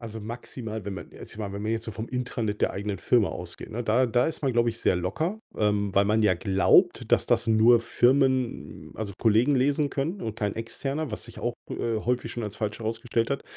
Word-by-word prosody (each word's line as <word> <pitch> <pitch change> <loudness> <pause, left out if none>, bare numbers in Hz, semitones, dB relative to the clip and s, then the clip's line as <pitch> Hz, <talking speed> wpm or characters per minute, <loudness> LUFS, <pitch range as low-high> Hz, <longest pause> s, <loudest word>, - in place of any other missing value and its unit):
Also, 110 -2 -7
maximal, 110 -1 -6
wenn 100 -1 -4
man 90 - -9
jetzt, - - -10
ich - - -12
meine, 100 -3 -4
wenn 100 - -5
wir 110 - 0
jetzt 115 0 -2
so - - -4
vom 110 +2 -5
Intranet 120 -4 -3
der - - +2
eigenen 100 -1 -3
Firma 115 0 +2
ausgehen, 90 +4 -7
ne, 120 +2 -3
da 120 +3 +3
da 120 +1 +2
ist 160 - -4
man, 135 - +1
glaube 120 0 +3
ich, 115 - -3
sehr 95 - +2
locker, 155 - -2 0.2
ähm, 105 -2 +1
weil 100 0 +4
man 110 +2 +2
ja 95 -4 +4
glaubt, 95 +2 +3
dass - - +3
das - - +1
nur 115 +2 +6
Firmen, 130 +1 +1
also, 105 -2 -5
Kollegen 120 +5 +3
lesen 140 +2 +2
können 160 +8 -2
und 110 -1 -4
kein 105 -2 -1
Externer, 135 +6 -3
was - - -4
sich - - -10
auch, - - -1
äh, 115 -1 -2
häufig 120 0 -1
schon 120 -2 -4
als 105 - -5
falsch 105 -1 -3
herausgestellt 115 +1 -1
hat. 140 - -2
115 Hz, 230 wpm, -26 LUFS, 105-125 Hz, 0.2 s, nur